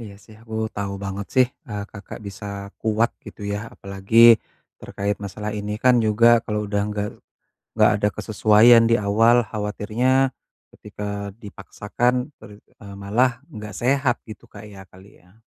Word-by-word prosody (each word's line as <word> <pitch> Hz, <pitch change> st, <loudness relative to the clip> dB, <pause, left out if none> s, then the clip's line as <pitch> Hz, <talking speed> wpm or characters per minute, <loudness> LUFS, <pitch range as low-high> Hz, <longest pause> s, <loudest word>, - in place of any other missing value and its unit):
Iya 105 Hz, -3 st, -10 dB
sih 110 Hz, -, -16 dB
aku 110 Hz, -1 st, -10 dB, 0.2 s
tahu 100 Hz, -1 st, -3 dB
banget 100 Hz, +1 st, -5 dB
sih, 130 Hz, -1 st, +5 dB, 0.2 s
eee, 105 Hz, -1 st, -4 dB
Kakak 100 Hz, +2 st, -10 dB
bisa 100 Hz, +1 st, -9 dB, 0.4 s
kuat 110 Hz, +1 st, +1 dB
gitu -, -, -12 dB
ya, 100 Hz, -, -2 dB
apalagi 100 Hz, +3 st, -6 dB, 0.6 s
terkait 100 Hz, +1 st, -3 dB
masalah 105 Hz, +2 st, -5 dB
ini 105 Hz, 0 st, -4 dB
kan 125 Hz, 0 st, +4 dB
juga 110 Hz, +2 st, +4 dB, 0.2 s
kalo 105 Hz, -1 st, -3 dB
udah 100 Hz, 0 st, 0 dB
gak 105 Hz, 0 st, -3 dB, 0.7 s
gak -, -, +5 dB
ada 105 Hz, -, +3 dB
kesesuaian 110 Hz, +2 st, +5 dB
di 115 Hz, -, +4 dB
awal, 115 Hz, +4 st, +3 dB
khawatirnya 115 Hz, +6 st, 0 dB, 0.4 s
ketika 100 Hz, -1 st, -6 dB
dipaksakan 120 Hz, +5 st, -3 dB
ter -, -, -12 dB, 0.3 s
eee, 100 Hz, -1 st, -10 dB
malah 120 Hz, +6 st, +2 dB, 0.2 s
gak 105 Hz, -2 st, -8 dB
sehat 130 Hz, 0 st, +1 dB
gitu 110 Hz, -3 st, -12 dB
Kak, 105 Hz, 0 st, -12 dB
ya, 100 Hz, -2 st, -12 dB
kali 95 Hz, +2 st, -18 dB
ya. 90 Hz, +5 st, -25 dB
105 Hz, 150 wpm, -22 LUFS, 100-115 Hz, 0.7 s, sih